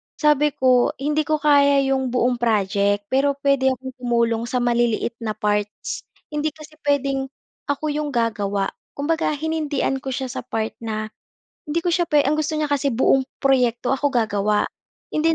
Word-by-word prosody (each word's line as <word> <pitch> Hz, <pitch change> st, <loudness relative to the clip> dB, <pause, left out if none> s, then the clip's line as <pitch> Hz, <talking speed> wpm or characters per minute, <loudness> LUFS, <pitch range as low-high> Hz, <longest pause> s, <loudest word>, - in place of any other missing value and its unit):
sabi 300 Hz, -1 st, +3 dB
ko, 255 Hz, -1 st, +3 dB
hindi 300 Hz, +1 st, +1 dB
ko 310 Hz, -, +2 dB
kaya 285 Hz, -2 st, +5 dB
yung 265 Hz, -1 st, +1 dB
buong 245 Hz, -1 st, +1 dB
project 205 Hz, -2 st, +1 dB
pero 275 Hz, +1 st, +2 dB
puwede 275 Hz, -1 st, +2 dB
akong 260 Hz, 0 st, -1 dB
tumulong 235 Hz, -2 st, +1 dB
sa 250 Hz, 0 st, -1 dB
maliliit 235 Hz, -1 st, +1 dB
na 220 Hz, -2 st, -3 dB
parts. 210 Hz, 0 st, -2 dB, 0.2 s
Hindi 300 Hz, +1 st, -2 dB
kasi 305 Hz, 0 st, -14 dB
puwedeng 275 Hz, -2 st, 0 dB, 0.4 s
ako 295 Hz, +1 st, -1 dB
yung 295 Hz, -2 st, -3 dB
gagawa. 205 Hz, -4 st, 0 dB, 0.2 s
Kumbaga, 310 Hz, +2 st, 0 dB
hinindian 295 Hz, -3 st, -1 dB
ko 270 Hz, -, -11 dB
siya 260 Hz, -1 st, -3 dB
sa -, -, -4 dB
part 220 Hz, 0 st, -2 dB
na 215 Hz, -1 st, -4 dB, 0.6 s
hindi 330 Hz, +3 st, -1 dB
ko 350 Hz, -, +1 dB
siya 345 Hz, -1 st, +1 dB
pwe 295 Hz, -1 st, +4 dB
ang 280 Hz, -, +2 dB
gusto 310 Hz, 0 st, -1 dB
niya 305 Hz, -, 0 dB
kasi 285 Hz, -1 st, +1 dB
buong 265 Hz, +2 st, +2 dB, 0.2 s
proyekto 250 Hz, -2 st, +2 dB
ako 285 Hz, +2 st, +1 dB
gagawa. 210 Hz, -4 st, +1 dB, 0.5 s
Hindi 325 Hz, +1 st, +2 dB
265 Hz, 165 wpm, -22 LUFS, 235-295 Hz, 0.6 s, kaya